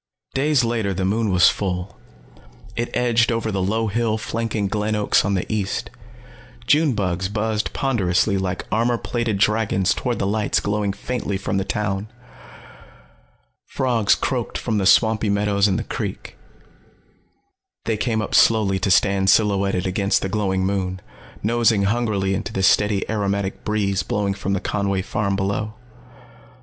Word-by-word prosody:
Days 140 -1 +2
later 115 -4 -1
the 95 +1 -1
moon 110 +3 0
was 90 -3 +5
full. 90 -1 -3 0.8
It 120 0 -2
edged 120 -1 +2
over 115 -1 -1
the 95 -1 -1
low 110 +4 0
hill 110 +1 0
flanking 110 -2 -2
Glen 105 +1 -1
Oaks 105 -1 +2
on 100 -1 0
the 90 - -1
east. 110 +3 -2 0.7
June 150 +2 +3
bugs 95 -2 -1
buzzed 110 +1 -1
ponderously 100 -6 +1
like 95 -1 -2
armor 115 +2 +1
plated 115 -3 -2
dragons 105 -2 +2
toward 125 -2 -2
the - - -1
lights 105 +1 +1
glowing 100 0 -1
faintly 105 -1 -3
from 100 +1 -2
the 95 - 0
town. 105 0 -2 1.6
Frogs 120 -5 +1
croaked 125 -4 -2
from 110 -3 -1
the 95 - +1
swampy 110 0 +4
meadows 100 0 +2
and 95 -1 0
the 115 - -2
creek. - - -5 1.5
They 110 - 0
came 110 0 -1
up - - -6
slowly 105 -4 +4
to 100 - -1
stand 95 +2 +3
silhouetted 100 -3 +2
against 100 +1 +1
the 95 - -2
glowing 95 -2 0
moon, 95 -1 -2 0.4
nosing 115 -2 +2
hungrily 100 -3 0
into - - -3
the 95 - -2
steady, 105 +1 +3
aromatic 100 -2 -2
breeze 100 -2 0
blowing 100 -1 -1
from 100 0 -3
the 100 - -1
Conway 100 -2 -1
farm 100 0 -1
below. 100 +2 -2
105 Hz, 150 wpm, -21 LUFS, 95-110 Hz, 1.6 s, was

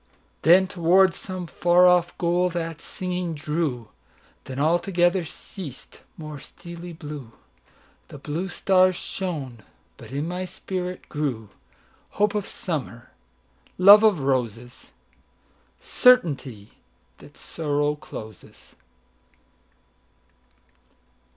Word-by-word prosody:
Then 180 +4 +6
toward 185 +1 +3
some 185 0 -7
far 175 +2 +3
off 180 -1 +3
goal 175 +1 +1
that 165 -2 -5
singing 180 -2 -4
drew; 145 -6 -3 0.6
Then 130 - -7
altogether 175 +4 +2
ceas'd; 160 -2 -10 0.2
more 155 -2 -8
steely 170 +4 -10
blueThe 140 - -13
blue 165 +6 -3
stars 185 0 +3
shone; 150 - -5 0.4
but - - -13
in 145 +4 -3
my 180 +1 -3
spirit 180 0 -5
grewHope 145 - -4
of 210 -2 -2
Summer, 120 - -5 0.7
love 200 +3 +9
of 210 -8 +3
Roses, 125 -2 -3 0.9
Certainty 140 - +2 0.4
that - - -16
Sorrow 145 -2 -1
closes. 110 -8 -12
170 Hz, 90 wpm, -24 LUFS, 140-180 Hz, 0.9 s, love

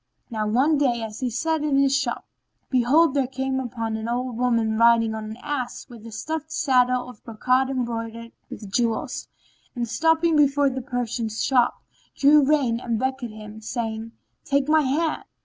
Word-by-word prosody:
Now, 215 -2 -2
one 275 +7 +2
day 240 -5 +1
as 215 -1 -6
he 255 - -1
sat 320 +7 -1
in 295 -2 +1
his 275 0 +3
shop, 270 -3 -2 0.5
behold, 260 +5 +4
there 275 -3 +1
came 265 0 -2
up 245 -2 -6
an 225 0 -3
old 250 0 -2
woman 230 -2 +1
riding 230 0 +4
on 220 0 -5
an 215 +1 -7
ass 260 -4 -4
with 230 -2 -11
a - - -10
stuffed 315 +6 -5
saddle 250 -5 +2
of 250 -4 -13
brocade 255 +4 +1
embroidered 230 -2 -4 0.2
with 205 -3 -9
jewels; 230 +1 -1 0.5
and, 240 -1 -2
stopping 325 +5 +2
before 285 -1 +3
the 260 +1 -4
Persian's 240 -3 -3
shop, 250 -3 +2 0.3
drew 290 +1 +5
rein 265 -5 +2
and 235 -2 -2
beckoned 260 -2 -3
him, 215 0 -10
saying, 225 0 -4 0.3
"Take 280 0 +1
my 310 0 +4
hand." 305 +4 0
250 Hz, 170 wpm, -24 LUFS, 230-275 Hz, 0.5 s, drew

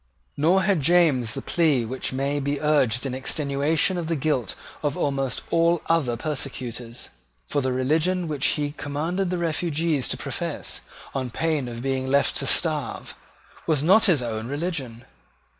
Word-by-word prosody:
Nor 180 +6 +3
had 190 -4 +2
James 140 -8 +3
the - - -5
plea 150 -8 +2
which 130 +3 -3
may 140 +2 -1
be 140 0 -1
urged 140 -5 +2
in 135 - -2
extenuation 145 +6 +1
of 165 - -4
the 165 - 0
guilt 135 -7 -1 0.3
of 145 -2 -1
almost 135 -2 -1
all 170 0 +3
other 145 -8 +1
persecutors: 125 -4 -4 0.4
for 145 - -1
the 130 -1 0
religion 160 +8 +1
which 145 -3 0
he 145 -1 0
commanded 160 +6 -2
the 180 - -1
refugees 165 -3 0
to - - -1
profess, - - -4 0.3
on 130 -2 -2
pain 155 0 -1
of 120 0 -6
being 135 -1 -1
left 140 +1 +3
to - - 0
starve, - - 0 0.5
was 150 -3 +2
not 195 +7 +6
his 165 - +3
own 110 -1 -3
religion. 140 -5 -4
145 Hz, 160 wpm, -24 LUFS, 130-165 Hz, 0.5 s, not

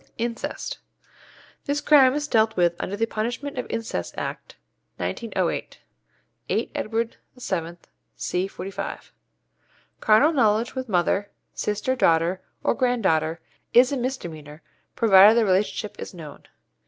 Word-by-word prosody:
=Incest.= 235 0 -4 0.9
This 285 0 0
crime 275 -3 +5
is 295 0 -2
dealt 220 -5 +2
with 175 -1 +3
under 200 - -3
the 225 - +1
Punishment 240 +5 -4
of - - -4
Incest 230 0 -4
Act, - - -5 0.4
1908 230 -2 -3 0.7
(8 - - -1
Edward 225 +1 -2 0.2
VII., 175 -8 -3 0.4
c. 180 +2 -2
45). 195 0 -7 0.9
Carnal 245 +10 +4
knowledge 225 -3 +2
with 260 -2 -5
mother, 195 +2 +1 0.2
sister, 210 +5 -1
daughter, 170 -3 +2 0.2
or - - +2
grand 245 -2 0
daughter, 160 -1 +1 0.3
is 250 +2 +7
a - - 0
misdemeanour, 165 - -5 0.3
provided 210 0 +7
the 230 - +4
relationship 200 +2 0
is - - -7
known. 155 -4 -11
215 Hz, 125 wpm, -24 LUFS, 185-245 Hz, 0.9 s, is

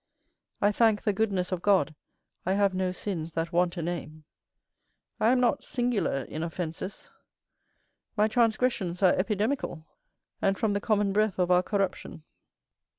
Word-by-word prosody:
I 205 - +4
thank 220 -1 +3
the 210 - +1
goodness 195 -3 0
of 180 -2 -2
God, 180 -7 +3 0.5
I 185 - 0
have 200 -1 +2
no 185 0 0
sins 170 -4 -4
that 165 +1 -2
want 175 +1 +1
a 170 - -2
name. 155 -2 -5 1.0
I 215 - +3
am 255 +1 +4
not 250 +3 +2
singular 240 - -1
in 155 - -6
offences; 170 +3 -5 1.1
my 210 +1 +4
transgressions 220 -5 +1
are 185 - +6
epidemical, 210 - -1 0.6
and 195 0 +2
from 215 -2 +1
the 200 - -1
common 205 -3 +1
breath 215 -1 +1
of 180 -1 +1
our 180 0 +5
corruption. 195 -5 -3
195 Hz, 150 wpm, -28 LUFS, 175-215 Hz, 1.1 s, are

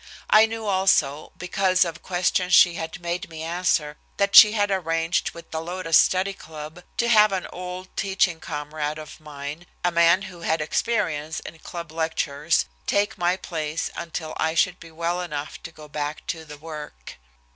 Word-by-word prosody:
I 215 +1 +7
knew 225 0 -5
also, 185 -7 +2
because 185 0 +2
of 165 -1 -6
questions 180 0 +1
she 175 - +7
had 160 +1 -5
made 175 +1 -4
me 160 -1 -7
answer, 165 -3 0 0.2
that 200 0 +1
she 210 -1 +11
had 205 -2 +1
arranged 165 -2 0
with 170 - -12
the 160 - -3
Lotus 170 -1 -1
Study 190 +3 +4
Club 155 0 -10 0.2
to 235 - +1
have 215 -3 +6
an 190 -2 -2
old 180 +1 -7
teaching 190 -3 +1
comrade 150 0 -4
of 155 -1 -10
mine, 150 +2 -8 0.2
a 175 - +3
man 170 +2 +4
who 180 -3 -10
had 160 0 0
experience 155 -3 -1
in 165 - -10
club 170 0 -8
lectures, 160 -1 0 0.2
take 205 +2 +1
my 175 +1 +2
place 155 -3 -3
until 160 -2 -5
I 160 0 0
should 180 +2 +2
be 165 - -12
well 170 +2 -2
enough 150 -4 -5
to 165 - -9
go 155 -1 -13
back 150 0 -4
to 160 -1 -11
the 150 -1 -10
work. 150 - -9
170 Hz, 175 wpm, -24 LUFS, 155-185 Hz, 0.2 s, she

